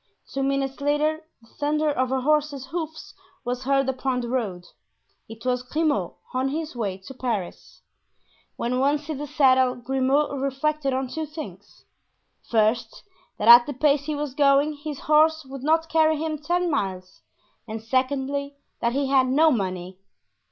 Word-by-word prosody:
Two 275 - -1
minutes 275 0 -1
later 300 +2 +1 0.2
the - - -20
thunder 300 +4 0
of 255 -2 -1
a 265 0 0
horse's 295 -1 +1
hoofs 320 0 -6 0.3
was 245 +1 -3
heard 275 0 +2
upon 260 -1 -1
the 240 -1 -4
road; 205 -9 -2 0.6
it 225 +2 -11
was 250 -1 +1
Grimaud, 270 - -1 0.2
on 260 +1 0
his 310 0 -4
way 200 -6 -2
to 190 +7 -11
Paris. 230 -8 -5 0.7
When 250 +2 -1
once 290 +3 +1
in 300 -3 -3
the 295 - -4
saddle 260 -2 +3
Grimaud 265 +3 0
reflected 275 +1 -1
on 260 0 -1
two 315 +4 -4
things; 205 - -10 0.6
first, 220 +1 +1 0.3
that 210 - -2
at 240 +2 +10
the 290 - -3
pace 285 +1 +2
he 305 0 -2
was 290 -2 -4
going 280 +1 +3
his 295 -1 -7
horse 310 0 +3
would 270 0 -8
not 320 +3 +2
carry 315 -1 +3
him 310 0 -3
ten 350 +3 0
miles, 185 -8 -3 0.5
and 220 0 -5
secondly, 270 +4 -1 0.2
that 235 0 0
he 280 +1 0
had 265 -1 +3
no 310 +5 +4
money. 185 -5 -3
270 Hz, 160 wpm, -24 LUFS, 250-300 Hz, 0.7 s, at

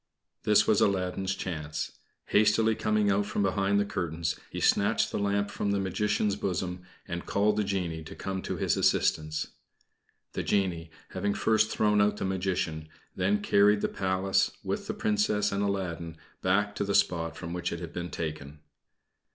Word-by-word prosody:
This 105 -1 +5
was 105 - +3
Aladdin's 95 0 +1
chance. 75 -5 -5 0.3
Hastily 110 +1 +4
coming 110 -2 +1
out 100 +1 +1
from 100 - -1
behind 100 +1 +2
the 100 - +2
curtains, 85 -5 -2
he - - -5
snatched - - +2
the - - -2
lamp 100 0 0
from 100 - -2
the 100 0 +1
Magician's 105 +2 0
bosom, 90 -1 -3 0.3
and 85 -1 -5
called 105 +1 +2
the 105 - +1
genie 90 -5 -2
to - - -9
come 95 -1 -4
to - - -4
his - - +1
assistance. 75 0 +1 0.8
The - - -2
genie, 90 -5 0 0.2
having 100 0 -1
first 110 0 +2
thrown 105 -1 +2
out 105 0 +2
the - - -2
Magician, 90 -5 -2 0.3
then 100 +3 +1
carried 100 +1 +4
the - - 0
Palace 95 0 +1
with - - -3
the - - -3
Princess 105 0 +1
and 100 0 -1
Aladdin 85 -5 -2 0.2
back 105 +2 +2
to - - 0
the 100 0 -1
spot 80 -2 +1
from 85 -1 -6
which 90 0 -2
it 85 - -4
had 85 -1 -7
been 90 0 -4
taken. 75 -3 -5
95 Hz, 170 wpm, -29 LUFS, 85-105 Hz, 0.8 s, This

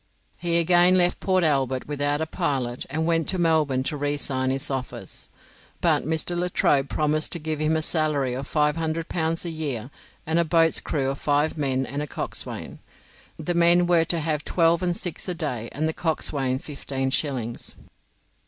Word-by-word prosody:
He 170 -1 +1
again 175 +2 +5
left 180 -1 +2
Port 185 -2 +2
Albert 135 -4 +1
without 145 0 -1
a - - +1
pilot 130 -6 -2
and 160 +3 -1
went 165 -1 +1
to 190 - +3
Melbourne 155 -6 +2
to 150 - -2
resign 145 -2 0
his 135 +2 -1
office. 130 -2 -5 0.5
But - - +2
Mr. 160 +2 0
Latrobe 160 -6 +1
promised 155 0 0
to - - -2
give 155 -1 -3
him 155 +1 +1
a 155 - -2
salary 150 -6 0
of 135 +2 -5
500 160 +2 0
pounds 165 0 -1
a 170 - -3
year 140 -6 -4 0.3
and 160 +2 +1
a - - +4
boat's 165 0 +3
crew 135 -3 -1
of 135 - -6
five 145 +1 +1
men 135 -3 0
and 140 +3 -4
a 150 - -4
coxswain. - - -5 0.6
The 175 - -2
men 170 +1 +5
were 170 -2 +3
to 170 +1 +1
have 150 -2 -1
twelve 170 0 +2
and 175 -1 0
six 175 +1 -3
a 180 - -2
day 125 -8 -3
and 155 +3 -1
the 160 - -1
coxswain 140 -6 -1
fifteen 135 -2 -3
shillings. 125 -6 -2
155 Hz, 180 wpm, -25 LUFS, 135-165 Hz, 0.6 s, again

